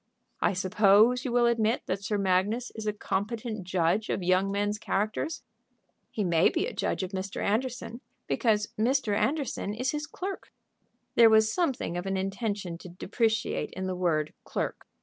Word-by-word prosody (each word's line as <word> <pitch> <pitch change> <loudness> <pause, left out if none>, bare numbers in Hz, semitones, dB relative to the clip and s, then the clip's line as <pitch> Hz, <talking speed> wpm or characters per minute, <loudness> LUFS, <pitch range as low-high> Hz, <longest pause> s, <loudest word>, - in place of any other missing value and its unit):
"I - - +3
suppose 210 +6 +4
you 255 - -1
will 240 0 +4
admit 230 0 +2
that 190 +2 -3
Sir 205 +2 -1
Magnus 200 +5 +1
is 220 -1 -6
a - - +3
competent 215 0 -3
judge 185 +4 +1
of 185 - -1
young 185 +2 +2
men's 205 +1 -1
characters?" 215 +11 -2 0.7
"He 215 - -2
may 170 -2 +4
be 340 - 0
a - - -5
judge - - -1
of 185 - -4
Mr. 190 0 -4
Anderson, 240 +2 -2 0.2
because 210 -3 +1
Mr. 235 -2 +2
Anderson 270 -5 -1
is 255 +4 -1
his 300 0 -4
clerk." 385 +1 -6 0.6
There 230 -1 +7
was 220 0 +4
something 270 - -1
of 175 +2 -4
an 195 0 0
intention 195 -2 -3
to 180 - -10
depreciate 220 +5 -1
in 185 - -4
the 185 -1 -2
word 160 -4 0
"clerk." - - -4
210 Hz, 170 wpm, -28 LUFS, 190-235 Hz, 0.7 s, There